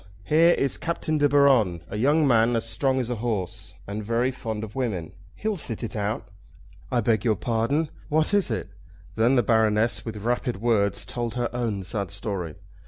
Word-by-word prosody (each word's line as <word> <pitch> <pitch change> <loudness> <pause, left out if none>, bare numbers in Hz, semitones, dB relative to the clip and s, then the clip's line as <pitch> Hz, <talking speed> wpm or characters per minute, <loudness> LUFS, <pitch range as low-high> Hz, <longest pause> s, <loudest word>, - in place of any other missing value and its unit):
Here 165 - +5
is 135 -1 -1
Captain 155 -2 -1
De 145 0 +4
Baron, 130 - +4
a - - -7
young 145 +7 +3
man 115 -1 +4
as 115 0 -1
strong 130 +2 +1
as 125 -1 -2
a 120 - -2
horse, 105 -6 -3
and 105 +2 -5
very 115 +4 +1
fond 110 -4 -5
of 105 -1 -7
women. 105 -11 -2 0.2
He'll 215 -2 -2
sit 120 -7 -1
it 115 - -4
out." 105 +1 -2 0.6
"I 120 - +2
beg 110 -2 +1
your 110 -2 +2
pardon; 125 +9 0 0.2
what 155 +4 +1
is 205 -2 +3
it?" - - -3 0.4
Then 115 +4 +3
the 120 - +4
Baroness, 110 0 +2
with 110 -2 -6
rapid 120 -2 -1
words, 100 -4 +1
told 120 +3 -4
her 120 -1 -2
own 110 -6 -2
sad 100 +1 -3
story. 100 -6 -4
115 Hz, 185 wpm, -25 LUFS, 105-130 Hz, 0.6 s, Here